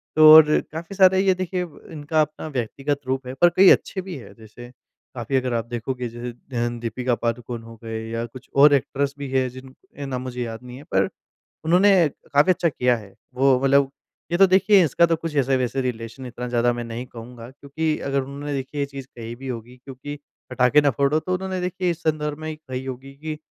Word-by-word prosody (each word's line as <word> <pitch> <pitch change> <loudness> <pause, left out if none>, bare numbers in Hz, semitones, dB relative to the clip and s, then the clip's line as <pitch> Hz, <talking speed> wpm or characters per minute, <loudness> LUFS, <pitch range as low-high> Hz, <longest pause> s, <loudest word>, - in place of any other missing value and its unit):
तो 155 0 +9
और 160 -1 +10 0.3
काफ़ी 165 +4 -7
सारे 190 -1 +5
ये 190 -1 +4
देखिए 185 0 -2 0.3
इनका 155 0 0
अपना 155 +1 -3
व्यक्तिगत 135 +2 -2
रूप 130 0 -2
है, 130 - -5
पर 175 +6 +5
कई 190 0 +8
अच्छे 190 - +1
भी 185 -1 -7
है 125 - -12
जैसे 120 +2 -13 0.4
काफ़ी 120 +2 -3
अगर 130 -1 0
आप 115 -1 -1
देखोगे 120 +1 -4
जैसे 120 +1 -6
अ, 120 0 -4
दीपिका 120 +2 -1
पादुकोण 115 0 -3
हो 115 0 -12
गए 110 0 -4
या 115 +1 -3
कुछ 120 +1 -13
और 145 +1 +7
एक्ट्रेस 140 +1 0
भी 140 -1 -6
है 130 -1 +1
जिनके 130 +2 -11
नाम 130 -2 -4
मुझे 125 -1 -5
याद 115 +1 -7
नहीं 125 0 -10
है, 140 - -11
पर 95 -8 0 0.6
उन्होंने 180 0 +5 0.3
काफ़ी 145 +6 +5
अच्छा 170 -2 +1
किया 125 -3 +1
है। 100 -3 -13 0.2
वो 130 0 +3
मतलब 135 0 +3 0.4
ये 175 - +2
तो 195 0 +7
देखिए 190 +1 +5
इसका 170 +3 +3
तो 165 - +1
कुछ 165 -1 -6
ऐसे-वैसे 130 -1 +1
रिलेशन 120 +1 -5
इतना 125 0 -6
ज़्यादा 120 0 +2
मैं 120 0 -4
नहीं 115 +2 -6
कहूँगा, 120 0 -11
क्योंकि 150 +3 -3
अगर 140 0 -1
उन्होंने 140 +2 -6
देखिए 135 +2 -4
ये - - +1
चीज़ 140 -1 -9
कही 115 0 -7
भी 135 +2 -9
होगी, 120 0 -7
क्योंकि 135 +3 -9 0.3
पटाखे 125 +3 +4
ना 145 - +3
फोड़ो, 140 +5 +1
तो 185 +3 -3
उन्होंने 190 0 -3
देखिए 180 0 -1
इस 170 - -7
संदर्भ 150 -1 -1
में 155 - -6
ही 155 - -5
कही 130 -4 -7
होगी 130 +1 -7
कि 155 -1 -4
135 Hz, 210 wpm, -23 LUFS, 120-155 Hz, 0.6 s, और